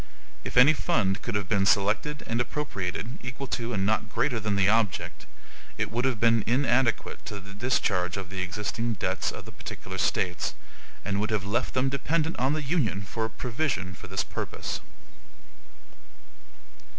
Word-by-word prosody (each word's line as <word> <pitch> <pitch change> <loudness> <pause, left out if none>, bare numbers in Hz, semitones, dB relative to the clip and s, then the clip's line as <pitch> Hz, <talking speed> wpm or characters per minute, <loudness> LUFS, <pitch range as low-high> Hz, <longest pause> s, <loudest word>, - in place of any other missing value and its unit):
If - - -5
any 130 +5 +9
fund 100 -8 +1
could 115 - -3
have 100 -2 0
been 100 -1 +3
selected 105 +11 +2
and 115 +1 0
appropriated, 115 -4 -3
equal 125 +2 -5
to 120 -1 -1
and 95 -4 +1
not 110 +1 +1
greater 120 +2 +1
than 105 -1 0
the 100 -1 +4
object, 100 -6 +1 0.5
it - - -1
would 120 +3 0
have 130 -5 +1
been 115 -1 +4
inadequate 120 -1 +2
to 105 -2 -4
the 100 +1 -11
discharge 100 -5 +1
of 95 -1 -5
the 95 -1 -2
existing 105 +5 -2
debts 100 - -1
of - - -8
the - - -9
particular - - -7
States, 90 -1 +1 0.5
and 100 0 0
would 105 +2 0
have 105 -3 0
left 105 +6 0
them 130 +1 +3
dependent 155 +4 0
on 130 +3 +3
the 155 0 -1
Union 130 - +1
for 110 +3 -2
a - - -2
provision 115 - -2
for 90 - -10
this 95 +1 0
purpose. - - -4
110 Hz, 170 wpm, -28 LUFS, 100-125 Hz, 0.5 s, any